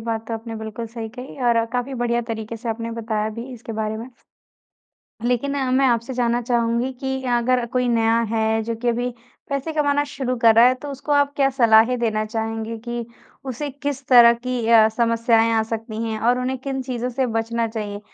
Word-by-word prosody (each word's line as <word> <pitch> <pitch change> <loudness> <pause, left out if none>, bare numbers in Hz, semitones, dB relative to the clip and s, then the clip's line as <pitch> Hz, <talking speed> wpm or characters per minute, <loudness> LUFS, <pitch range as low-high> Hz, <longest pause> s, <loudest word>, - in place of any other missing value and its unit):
बात 225 0 -3
तो 230 - -2
आपने 225 0 -6
बिल्कुल 220 +1 -6
सही 225 -1 -6
कही 250 +4 -10
और 235 -1 +4
अ, 230 - +3
काफ़ी 250 +2 -2
बढ़िया 240 -1 0
तरीके 220 0 -4
से 230 +1 -7
आपने 230 +1 -3
बताया 215 -1 -1
भी 235 +2 -6
इसके 235 -2 -8
बारे 220 0 -2
में। 235 +3 -8 1.1
लेकिन 250 +4 0 0.2
मैं 270 0 +4
आपसे 235 +1 0
जानना 240 -1 +1
चाहूँगी 235 +1 0
कि 265 -1 -2 0.2
अगर 250 +1 +1
कोई 250 -1 +1
नया 230 -1 +3
है 220 0 +1
जो 230 +1 -2
कि 245 - +1
अभी 245 +1 0 0.4
पैसे 280 +3 -2
कमाना 290 -1 +1
शुरू 265 -3 -3
कर 225 -1 +7
रहा 230 +2 +7
है, 255 - +2
तो 290 +3 -9
उसको 285 +2 -4
आप 285 0 +3
क्या 275 -1 +3
सलाहें 235 -1 +4
देना 215 -2 0
चाहेंगे 225 0 -3
कि 240 -1 -4 0.4
उसे 285 +4 -4
किस 280 0 -5
तरह 240 -2 +8
की 245 -1 -3
अ, 225 -2 +7
समस्याएँ 230 0 +2
आ 225 -1 +3
सकती 225 0 -5
हैं 220 0 -3
और 245 +2 +2
उन्हें 255 +1 -2
किन 265 0 -4
चीज़ों 250 -1 -3
से 260 +2 0
बचना 230 +1 -1
चाहिए 210 -2 -5
235 Hz, 200 wpm, -22 LUFS, 225-255 Hz, 1.1 s, तरह